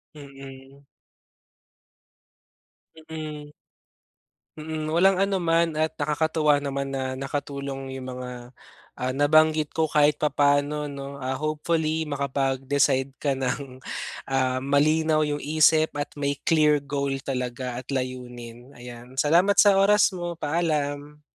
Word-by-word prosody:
Mm. 135 -1 -12 2.3
Mm. 150 -2 -7 1.1
Mm, 155 0 -4
walang 185 +4 +3
anuman 170 -5 +1
at 155 0 0
nakakatuwa 150 0 +2
naman 140 -1 -3
na 130 -1 -3
nakatulong 135 0 -5
'yung 130 -1 -7
mga, 125 -1 -8 0.5
ah, 130 0 -2
nabanggit 155 +2 +3
ko 160 -1 0
kahit 150 -1 +3
papaano 145 0 +1
'no? 140 0 -8
Ah, 130 0 -2
hopefully 155 +1 -1
makapag-decide 135 -1 0
ka 140 -2 0
ng, 130 0 -3 0.5
ah, 130 -1 0
malinaw 155 +3 +2
'yung 150 -1 0
isip 155 +1 +3
at 145 0 -3
may 140 -1 -2
clear 150 -3 +3
goal 140 0 -2
talaga 125 -1 -4
at 125 - -7
layunin, 125 -1 -6
ayan. 120 0 -11
Salamat 180 +6 +4
sa 200 -2 +5
oras 205 +2 +5
mo, 175 -1 -4
paalam. 150 -2 -2
145 Hz, 110 wpm, -25 LUFS, 135-155 Hz, 2.3 s, sa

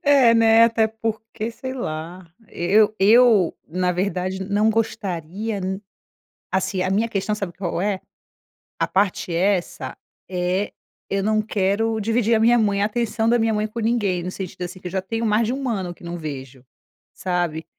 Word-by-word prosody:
É 275 -5 +6
né, 225 0 +6
até 225 -1 +3
porque, 220 0 -4
sei 260 +3 -6
lá, 170 -4 -5 0.2
e - - -8
eu 210 +3 +4
eu, 215 -2 +5
na 180 +3 0
verdade, 185 0 -2
não 210 +3 +2
gostaria 205 -1 -2
n 190 +2 -3 0.7
assim, 190 0 0
a 185 - 0
minha 210 +4 +1
questão 210 -1 -1
sabe 195 -5 -4
qual 175 -1 -3
é? 200 -2 0 0.8
A - - +1
parte 190 -2 0
essa 180 +1 0 0.3
é 180 +2 -1 0.4
eu 195 0 0
não 215 0 +2
quero 215 +2 0
dividir 225 +1 +2
a - - +3
minha 235 +2 +5
mãe, 205 -3 +2
a - - +3
atenção 225 0 -1
da 240 - +4
minha 225 -1 +1
mãe 215 0 0
com 225 +2 -7
ninguém, 205 -6 0
no 180 - -4
sentido 185 -2 -7
assim, 180 +1 -7
que 180 - -7
eu 175 - -6
já 190 - -1
tenho 225 +4 -3
mais 215 +1 +3
de 240 - -1
1 270 0 -3
ano 190 -6 -2
que 175 - -20
não 170 +1 -4
vejo, 135 -5 -7 0.5
sabe, 175 -3 -2
205 Hz, 180 wpm, -22 LUFS, 180-225 Hz, 0.8 s, É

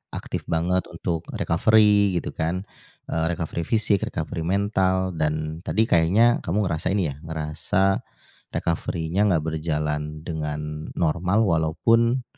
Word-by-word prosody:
aktif - - -5
banget 90 +3 0
untuk 85 -1 -4
recovery, 105 +2 +4
gitu - - -5
kan. 85 +4 -2 0.5
Eee, 80 0 0
recovery 80 -1 -4
fisik, 105 -3 +2
recovery 80 +1 -4
mental, 95 -1 +1
dan 80 -1 -2
tadi 110 - +1
kayaknya, 110 +5 +4
kamu 105 +6 0
ngerasain 85 +3 -1
ya, 75 -6 -2
ngerasa 80 +5 0 0.5
recovery-nya 85 +4 -1
nggak 85 -5 +2
berjalan 75 -1 -2
dengan 75 -1 -4
normal, 90 +6 +2
walaupun 115 +9 +2
85 Hz, 115 wpm, -24 LUFS, 80-100 Hz, 0.5 s, recovery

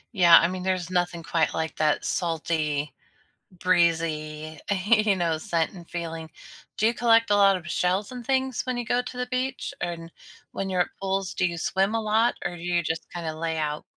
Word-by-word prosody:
Yeah, 170 -3 +8
I 170 - +5
mean, 185 +1 -4
there's 185 -1 -1
nothing 175 -2 -1
quite 165 -1 0
like 160 0 -3
that 155 -1 +1
salty, 155 -3 -1 0.6
breezy, 160 -4 0 0.3
you 215 -3 +4
know, 165 -3 0
scent 165 0 -1
and 175 -3 -13
feeling. 165 -2 -5 0.5
Do 215 - +2
you 230 - +2
collect 230 -2 +4
a 205 - +5
lot 195 -1 +5
of 170 -1 -8
shells 185 +6 0
and 245 -2 -7
things 265 -1 0
when 255 -1 -2
you 240 - -2
go 245 +1 +1
to 250 - -8
the 250 - -2
beach? 255 +1 -3
And 170 -1 -5 0.4
when 195 -1 -3
you're 180 -1 +3
at - - -8
pools, 195 -1 -1
do - - 0
you 170 -1 -1
swim 195 +6 +1
a - - 0
lot, 220 +2 +2
or 175 - -2
do 170 - -10
you 175 0 +1
just 160 0 -4
kinda 165 -2 -4
lay 160 0 -2
out? 150 -1 -2
175 Hz, 200 wpm, -26 LUFS, 165-210 Hz, 0.6 s, Yeah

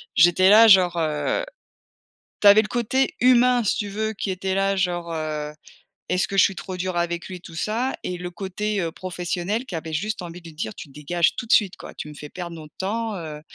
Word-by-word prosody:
j'étais 180 +2 +5
là 225 +2 +8
genre, 185 -4 +6
heu, 155 - 0 1.0
tu 205 - +6
avais 205 +2 +9
le 210 - -6
côté 245 +3 0
humain 250 0 +5
si 205 - +1
tu 205 - -2
veux 220 +2 -2
qui 200 -1 -4
était 190 +1 -2
là 195 0 +1
genre, 175 -3 -1
heu: 155 -2 -3 0.6
«Est-ce 180 - +1
que 195 - -4
je - - +7
suis 195 - +1
trop 185 +1 -6
dure 180 -1 -3
avec 170 0 -2
lui?» 185 - -7
et - - -14
tout 170 -1 -12
ça 230 +8 -1
et 180 -1 -3
le 180 0 -6
côté, 200 +3 -3
heu, 165 -1 -2
professionnel 180 +6 -3
qui 180 - -6
avait 160 0 -5
juste 210 +6 -2
envie 175 +1 -9
de 165 - -11
lui 155 - -15
dire: 110 -8 -4
«Tu - - -10
dégages 150 +5 0
tout 245 - -5
de 230 - +2
suite 200 -4 +3
quoi. - - -10
Tu 150 - -7
me 150 - -11
fais 150 0 -9
perdre 175 -2 -7
nos 155 -1 -10
temps, 220 +3 -2
heu». 155 -4 -7
185 Hz, 235 wpm, -23 LUFS, 170-210 Hz, 1.0 s, avais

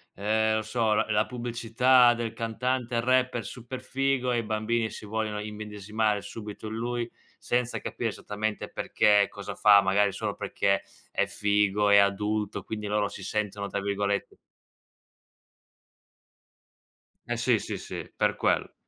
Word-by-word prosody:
ehm, 110 +2 +1
non 110 0 0
so, 110 0 +1
la 105 - +2
la 105 - +3
pubblicità 120 +1 +3
del 115 -1 -3
cantante 120 +1 -1
rapper 130 -1 +2
super 125 +4 -7
figo 135 -1 0
e 120 - +1
i 115 - 0
bambini 110 +1 0
si - - -9
vogliono 110 0 -2
immedesimare 105 0 -2
subito 105 +1 -8
in 110 - -5
lui, 120 +1 -3 0.3
senza 125 0 -1
capire - - -3
esattamente 105 +1 -4
perché 105 -1 +3
e - - -1
cosa 100 0 -7
fa, 100 -1 +7
magari 100 +1 +2
solo - - -3
perché 100 0 0 0.3
è - - +1
figo, 105 0 +1
è 100 - +7
adulto, 105 +1 +1
quindi 105 -1 -5
loro 105 0 +1
si 95 - -9
sentono 105 -1 -2
tra 100 0 -3
virgolette 100 0 -1 2.9
Eh - - -1
sì, - - +3
sì, - - -5
sì, - - -7
per - - +2
quello. - - 0
110 Hz, 145 wpm, -27 LUFS, 105-120 Hz, 2.9 s, fa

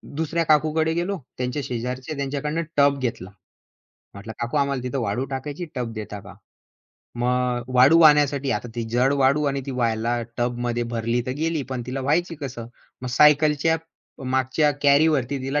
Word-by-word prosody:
दुसऱ्या 160 +2 -1
काकूकडे 155 +1 +2
गेलो 175 +4 -2 0.2
त्यांच्या 125 +3 -2
शेजारच्या. 125 +4 -4
त्यांच्याकडनं 145 +3 -2 0.2
टब 140 0 +4
घेतला. 115 -7 -3 0.9
म्हटलं, 100 +3 -8
"काकू 120 +4 -3
आम्हाला 140 -2 0
तिथं 125 +2 -3
वाळू 115 +3 -1
टाकायची 140 +5 -5
टब 120 -3 -3
देता 105 -2 -7
का?" - - -13 0.9
मग 125 0 0
वाळू 135 +7 +6
आणण्यासाठी 145 -2 +2
आता 120 - -2
ती 120 - -2
जड 125 +3 +2
वाळू 140 +1 +3
आणि 140 -1 0
ती - - -3
वहायला 120 -1 0 0.2
टबमध्ये 120 0 -1
भरली 115 +1 0
तर 130 - -1
गेली 160 -1 -1
पण 130 -2 -3
तिला 130 +2 -4
व्हायची 165 +6 0
कसं? 125 -5 -6 0.4
मग 125 - -4
सायकलच्या 150 +1 +4 0.5
मागच्या 130 +3 +1
कॅरीवरती 140 -2 +3
तिला 135 +3 -1
135 Hz, 155 wpm, -23 LUFS, 120-150 Hz, 0.9 s, वाळू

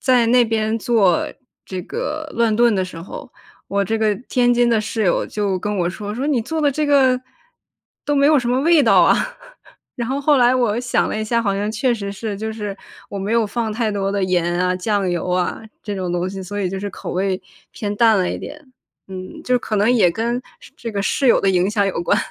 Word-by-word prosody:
在 250 -3 +3
那 245 +1 +5
边 220 0 0
做 210 -7 +2 0.4
这 185 -1 -5
个 310 - -4
乱 230 -2 +2
炖 235 -2 +4
的 190 - 0
时 175 -3 -9
候， 170 - -9 0.4
我 200 0 0
这 225 +3 -1
个 215 -1 +2
天 245 -1 +3
津 240 0 +3
的 225 -2 +3
室 220 +1 -3
友 180 - +1
就 200 -3 -1
跟 210 +2 -3
我 175 -1 0
说， 205 +2 -6
说 260 +5 -2
你 285 -5 +1
做 315 +8 -3
的 290 -2 +3
这 300 +2 -1
个， 265 -3 +4 0.8
都 290 - 0
没 280 0 +4
有 300 0 +5
什 245 -2 -2
么 250 +2 +2
味 325 +1 +5
道 230 - +5
啊， - - +5 0.8
然 235 -2 -3
后 270 +2 -1
后 290 +1 +4
来 245 0 +5
我 240 -2 +1
想 245 -1 +1
了 215 - -2
一 215 - -2
下， 230 +1 0
好 200 -3 0
像 205 +2 -1
确 235 +4 +1
实 200 -3 -5
是， 210 +1 -4
就 220 +2 -4
是 210 -2 -5 0.4
我 200 - -5
没 200 +3 -2
有 230 -1 +3
放 225 +2 -2
太 225 0 -1
多 195 -1 -1
的 200 - -1
盐 175 -1 0
啊、 180 0 +1
酱 200 0 0
油 175 +1 -2
啊， 180 0 0 0.2
这 205 - -4
种 185 -2 -3
东 175 +1 -1
西， 195 -1 -6
所 205 +3 -6
以 185 - 0
就 190 - -4
是 205 - -3
口 - - -7
味 190 +1 -1 0.3
偏 205 -1 -4
淡 225 -1 +5
了 180 - 0
一 - - -4
点。 295 -3 -10 0.4
嗯， 185 -1 -8
就 250 0 +2
可 220 - -4
能 210 +3 +3
也 220 -8 +4
跟 235 +6 -2 0.4
这 230 -2 -6
个 200 -1 -1
室 270 +6 0
友 - - +5
的 195 - +2
影 185 +1 +2
响 205 -1 +1
有 190 -3 -2
关。 - - +2
215 Hz, 255 characters per minute, -20 LUFS, 195-245 Hz, 0.8 s, 那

